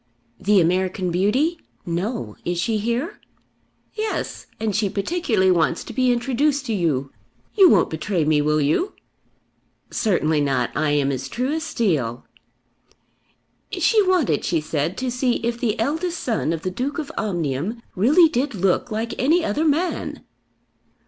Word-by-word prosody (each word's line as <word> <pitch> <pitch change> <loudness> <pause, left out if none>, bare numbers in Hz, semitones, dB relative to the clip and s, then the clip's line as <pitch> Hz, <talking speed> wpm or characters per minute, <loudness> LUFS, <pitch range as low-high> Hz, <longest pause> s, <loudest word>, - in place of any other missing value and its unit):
"The 205 0 +4
American 185 +1 +1
beauty? 255 - +1 0.3
No. 170 - -3
Is 175 0 -2
she 215 +4 0
here?" 235 +9 -2 0.7
"Yes; 435 0 -3
and 215 -3 -1
she 210 -1 +1
particularly 210 - +1
wants 170 -3 +1
to - - -9
be 255 -1 +2
introduced 270 +4 +1
to 230 - -2
you; 145 -8 0 0.4
you 390 -4 +7
won't 190 - +4
betray 160 +1 -1
me, 150 -1 +3
will 150 +1 +2
you?" 155 - +1 1.0
"Certainly 160 -8 +1
not; 135 -4 0
I 155 0 +1
am 145 -1 +2
as 135 0 -4
true 255 - -1
as 320 - -1
steel." 160 - -1 1.5
"She 440 -2 +3
wanted, 365 -7 +2
she 170 - +1
said, 155 +2 -2
to 255 -1 -2
see 250 0 +1
if 235 0 -1
the 230 -2 -1
eldest 320 +9 -1
son 225 -9 -1
of 165 -1 -3
the 185 - -2
Duke 255 - -3
of 305 -4 -4
Omnium 175 - -2
really 290 - +5
did 270 -3 -1
look 190 +4 +1
like 225 +1 -3
any 320 +6 +3
other 295 +10 0
man." 320 +4 -1
210 Hz, 150 wpm, -22 LUFS, 165-270 Hz, 1.5 s, you